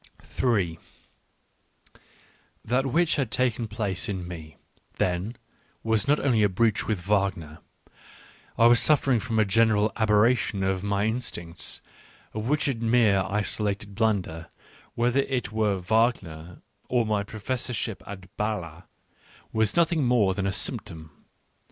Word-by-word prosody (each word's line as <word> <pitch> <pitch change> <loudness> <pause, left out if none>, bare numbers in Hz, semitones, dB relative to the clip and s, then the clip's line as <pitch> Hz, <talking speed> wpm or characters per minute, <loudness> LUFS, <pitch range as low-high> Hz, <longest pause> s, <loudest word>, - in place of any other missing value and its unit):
3 95 -10 0 1.9
That 125 +4 +1
which 170 +5 +2
had 135 -5 0
taken 120 0 0
place 105 -3 -3
in 95 -3 -4
me, 80 -4 -9 0.4
then, 90 +6 -1 0.5
was 110 0 +1
not 150 +1 +3
only 125 -6 +2
a 105 - +4
breach 110 +4 +1
with 110 -4 0
Wagner 95 -5 -1 0.5
— - - -24
I 115 - +5
was 120 0 +6
suffering 140 -5 +3
from 115 -1 -3
a 110 - +4
general 110 +1 +3
aberration 110 -1 +2
of 95 -1 0
my 100 0 0
instincts, 110 -7 -4 0.5
of 110 +3 -3
which 150 0 +1
a 135 - +1
mere 115 -4 +3
isolated 105 0 -2
blunder, 95 -7 -1 0.5
whether 120 +3 +2
it 130 -6 -1
were 110 -2 +1
Wagner 90 -5 -1 0.3
or 120 -2 +2
my 105 -2 0
professorship 115 +1 -3
at 100 -1 -7 0.2
B&le, 90 -6 -3 0.7
was 110 -2 +1
nothing 170 -2 +2
more 115 -6 +3
than 95 0 -2
a - - +1
symptom. 85 -6 -3
110 Hz, 135 wpm, -26 LUFS, 95-120 Hz, 1.9 s, was